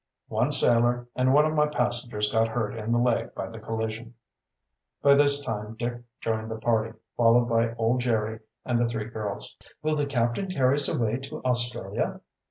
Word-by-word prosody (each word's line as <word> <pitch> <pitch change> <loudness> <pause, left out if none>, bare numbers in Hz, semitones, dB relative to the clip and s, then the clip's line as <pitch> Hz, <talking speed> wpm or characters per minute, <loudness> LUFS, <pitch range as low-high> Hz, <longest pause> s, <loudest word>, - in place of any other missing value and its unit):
"One - - +1
sailor, 120 +1 +3
and 130 0 +2
one 150 +2 +5
of 155 - 0
my 150 -1 +3
passengers 120 -6 -1
got 110 0 +3
hurt 110 -2 -2
in 110 0 -4
the 120 - +3
leg 120 -1 0
by - - -4
the 115 - -9
collision." 110 +1 -4 0.9
By 140 - +7
this 140 0 +4
time 105 -2 -4
Dick 120 +1 -4 0.2
joined 110 0 -2
the 110 - -4
party, 110 0 0 0.2
followed 120 +1 +4
by 115 0 +1
old 120 +2 +1
Jerry 110 -2 -1 0.3
and 120 -1 +1
the 120 - +2
three 115 -2 -3
girls. 105 -3 -5 0.3
"Will 155 0 +1
the 145 -1 0
captain 120 +7 0
carry 135 -6 +2
us 145 - +3
away 115 0 0
to 135 +1 -8
Australia?" 120 -5 0
120 Hz, 180 wpm, -26 LUFS, 110-125 Hz, 0.9 s, By